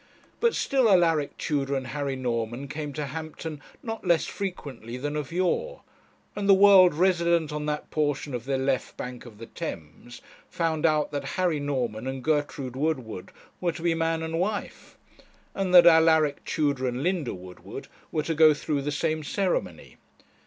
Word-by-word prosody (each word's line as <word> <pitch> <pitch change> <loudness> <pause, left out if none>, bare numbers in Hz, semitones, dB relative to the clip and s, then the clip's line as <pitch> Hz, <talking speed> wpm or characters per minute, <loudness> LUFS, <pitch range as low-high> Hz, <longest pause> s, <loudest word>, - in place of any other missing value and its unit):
But 470 -1 +2
still 265 -5 +2
Alaric 165 -6 +3
Tudor 140 -2 -1
and 135 -1 -2
Harry 140 +1 -3
Norman 120 +1 -3
came 150 +1 -5
to 150 0 -3
Hampton 155 +1 -6 0.2
not 225 -2 -5
less 170 -3 +2
frequently 140 - -6
than 145 +3 -3
of 150 -1 -4
yore, 325 - -1 0.5
and 205 -1 -2
the 195 - +9
world 190 -4 +7
resident 170 -2 +2
on 150 0 -3
that 150 0 -3
portion 145 -2 -1
of 120 -1 -4
the 135 0 0
left 130 0 -1
bank 125 0 -7
of 110 -3 -13
the 115 - -9
Thames 80 +6 -8 0.3
found 165 -2 0
out 155 -1 +1
that 145 -1 -3
Harry 175 -5 +1
Norman 125 -5 -2
and 130 -1 -4
Gertrude 145 -4 -1
Woodward 130 -10 -3 0.3
were 175 -2 0
to 165 - -9
be 170 -1 +2
man 165 0 -1
and 165 +1 -2
wife, 205 +3 -4 0.6
and 195 -2 -2
that 175 - +10
Alaric 160 -3 +5
Tudor 140 -4 0
and 125 +2 -3
Linda 175 - -1
Woodward 90 0 -10 0.2
were 155 - -1
to 165 - -1
go 155 -1 +6
through 145 0 -2
the 145 +2 -2
same 155 +1 -1
ceremony. 160 - -2
150 Hz, 170 wpm, -26 LUFS, 135-170 Hz, 0.6 s, that